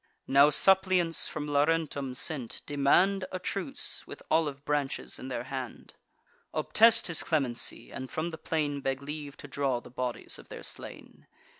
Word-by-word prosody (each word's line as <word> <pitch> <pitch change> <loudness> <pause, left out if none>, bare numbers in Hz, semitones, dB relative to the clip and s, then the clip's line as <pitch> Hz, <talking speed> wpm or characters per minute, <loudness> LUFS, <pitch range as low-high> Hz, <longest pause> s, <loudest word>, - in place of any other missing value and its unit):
Now 140 +2 +6
suppliants, 185 0 +4
from 150 -1 -5
Laurentum 145 -2 0
sent, 130 -3 -1
demand 180 +7 +3
A 185 - -2
truce, 200 +9 -3
with - - -10
olive 145 -3 +1
branches 145 -2 -2
in 130 - -7
their 125 -2 -3
hand; 130 -1 -7 0.6
Obtest 230 +1 +5
his 170 -2 +2
clemency, 135 -7 -2
and 130 0 -6
from 160 +2 -3
the 160 - -8
plain 145 -3 -2
Beg 135 0 -2
leave 150 0 -7
to - - -10
draw 135 -3 -1
the 120 - -14
bodies 125 -1 -3
of - - -15
their - - -9
slain. - - -6
145 Hz, 155 wpm, -29 LUFS, 135-165 Hz, 0.6 s, Now